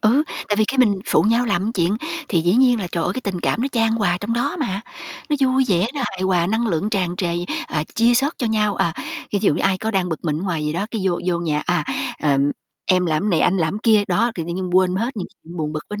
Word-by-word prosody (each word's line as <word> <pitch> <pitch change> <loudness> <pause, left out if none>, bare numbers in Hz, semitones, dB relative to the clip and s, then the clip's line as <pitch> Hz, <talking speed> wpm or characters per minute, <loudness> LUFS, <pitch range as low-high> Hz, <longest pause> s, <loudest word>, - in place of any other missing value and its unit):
ừ, 240 +7 +4 0.3
tại 205 - +1
vì 215 - +4
khi 270 - -1
mình 220 -5 +5
phụ - - +3
nhau 230 +3 +2
làm 205 +1 0
chuyện 185 0 +1 0.3
thì 170 -5 +2
dĩ 175 +3 +2
nhiên 245 -2 +4
là 185 - -3
trời 170 - 0
ơi - - 0
cái 255 - -4
tình 190 -6 -3
cảm 230 - 0
nó 270 - 0
chan 225 -2 +2
hòa 205 -6 +1
trong 210 +3 -2
đó 260 +8 -1
mà, 195 - -2 0.5
nó 295 - +3
vui 265 0 +3
vẻ 185 +1 +3
nó 285 - -3
hài 190 -1 -5
hòa 180 -2 +2
năng 225 +5 0
lượng 200 +2 -1
tràn 180 -3 -1
trề, 180 - -1 0.4
à, 150 0 -2
chia 235 +2 +4
sớt 275 +5 +2
cho 245 - 0
nhau, 210 -2 +1
à, 165 - +1 0.4
ví 205 - +2
dụ 195 - +3
như - - -2
ai 190 -1 +2
có 220 - -2
đang 190 -3 0
bực 160 -1 -5
mình 155 -2 0
ở - - -5
ngoài 170 -5 -2
gì 150 - -1
đó, 190 +6 -2
cái 225 - -3
vô 180 -2 +1
vô 175 -2 +1
nhà, 155 -3 -1
à, 175 0 +1 0.4
ờ, 145 -3 +3 0.5
em 185 -1 +3
làm 160 +6 0
này, 170 - +2
anh 190 - +3
làm 170 +4 0
kia. 215 -2 +4
Đó, 215 +7 +2
thì 165 - -3
tự - - -2
nhiên 185 0 -3
quên 185 -1 +3
hết 235 +5 -2
những 190 - -3 0.2
chuyện 170 +2 -10
buồn 155 -2 -2
bực 155 -1 -5
bên 210 - -4
195 Hz, 280 wpm, -21 LUFS, 175-225 Hz, 0.5 s, mình